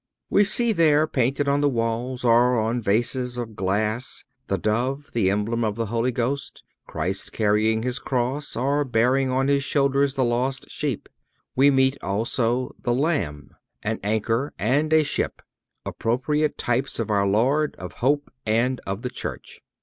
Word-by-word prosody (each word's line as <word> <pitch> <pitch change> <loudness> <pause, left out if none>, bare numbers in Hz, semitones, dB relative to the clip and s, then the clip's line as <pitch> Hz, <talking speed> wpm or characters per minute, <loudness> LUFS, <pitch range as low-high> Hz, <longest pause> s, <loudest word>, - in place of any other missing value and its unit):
We 205 - +5
see 235 +3 +2
there 155 -5 +4
painted 135 0 0
on 140 +1 +2
the 145 - +3
walls 120 +1 -2
or 120 +1 +4
on 115 +2 0
vases 120 +4 0
of 115 -3 -5
glass 105 +6 -1 0.2
the 100 - 0
Dove, 125 - -1
the 105 -5 +2
emblem 105 +4 0
of 105 -2 -1
the 115 0 -2
Holy 115 +3 0
Ghost, 125 +4 -3 0.2
Christ 95 +1 -3
carrying 110 +1 +2
His 125 +1 -2
cross, 130 +3 -2
or 140 +4 +1
bearing 130 +1 +2
on 130 +1 +1
His 140 -1 +2
shoulders 140 -1 +1
the 135 - +1
lost 125 +3 -1
sheep. 140 -7 -3 0.5
We 135 +2 +6
meet 135 0 +2
also 115 +5 0
the 120 -2 0
Lamb, 135 - -1 0.3
an 110 +1 -2
anchor 115 +6 0
and 140 - +1
a 160 0 +5
ship—appropriate 145 +1 -2
types 125 +3 -1
of 115 -2 -2
our 100 -1 +2
Lord, 135 +9 +2
of 90 0 -8
hope 145 +3 +1
and 120 +4 +1
of 95 +3 -4
the 125 - -3
Church. - - -7
125 Hz, 155 wpm, -24 LUFS, 110-140 Hz, 0.5 s, We